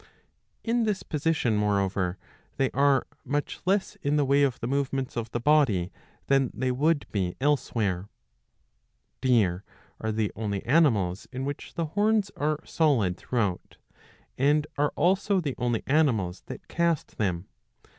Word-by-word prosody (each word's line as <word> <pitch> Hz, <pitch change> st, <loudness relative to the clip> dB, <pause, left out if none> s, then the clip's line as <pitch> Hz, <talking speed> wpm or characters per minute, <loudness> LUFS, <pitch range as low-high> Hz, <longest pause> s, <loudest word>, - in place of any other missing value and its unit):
In 235 Hz, 0 st, +1 dB
this 210 Hz, -3 st, -1 dB
position, 150 Hz, -7 st, 0 dB
moreover, 100 Hz, -3 st, 0 dB, 0.4 s
they 135 Hz, -1 st, +1 dB
are 140 Hz, -1 st, +3 dB, 0.2 s
much 145 Hz, +1 st, -2 dB
less 195 Hz, +1 st, +1 dB
in 145 Hz, +1 st, +1 dB
the 145 Hz, -1 st, +3 dB
way 140 Hz, +1 st, +3 dB
of 135 Hz, -4 st, +1 dB
the -, -, -4 dB
movements 135 Hz, 0 st, -1 dB
of 115 Hz, -2 st, -3 dB
the 120 Hz, -, -3 dB
body 120 Hz, -, +3 dB, 0.3 s
than 135 Hz, -2 st, +3 dB
they 130 Hz, +3 st, 0 dB
would 145 Hz, +3 st, +1 dB
be 95 Hz, -4 st, -1 dB
elsewhere. 110 Hz, -9 st, 0 dB, 1.1 s
Deer 105 Hz, -8 st, +2 dB, 0.4 s
are 110 Hz, -, -2 dB
the 110 Hz, -1 st, -1 dB
only 100 Hz, -2 st, -3 dB
animals 110 Hz, -, +2 dB
in 130 Hz, +1 st, -4 dB
which 145 Hz, 0 st, -6 dB
the 165 Hz, -, -1 dB
horns 210 Hz, -1 st, +2 dB
are 150 Hz, +1 st, -1 dB
solid 125 Hz, -, +2 dB
through 125 Hz, +5 st, -3 dB
out, 95 Hz, -4 st, -3 dB, 0.6 s
and 145 Hz, +2 st, +3 dB
are 145 Hz, 0 st, +1 dB
also 195 Hz, +2 st, +2 dB
the 145 Hz, -6 st, -2 dB
only 120 Hz, -2 st, 0 dB
animals 115 Hz, -, +1 dB
that -, -, -9 dB
cast 170 Hz, -2 st, -1 dB
them. 90 Hz, -4 st, -1 dB
135 Hz, 145 wpm, -27 LUFS, 105-150 Hz, 1.1 s, are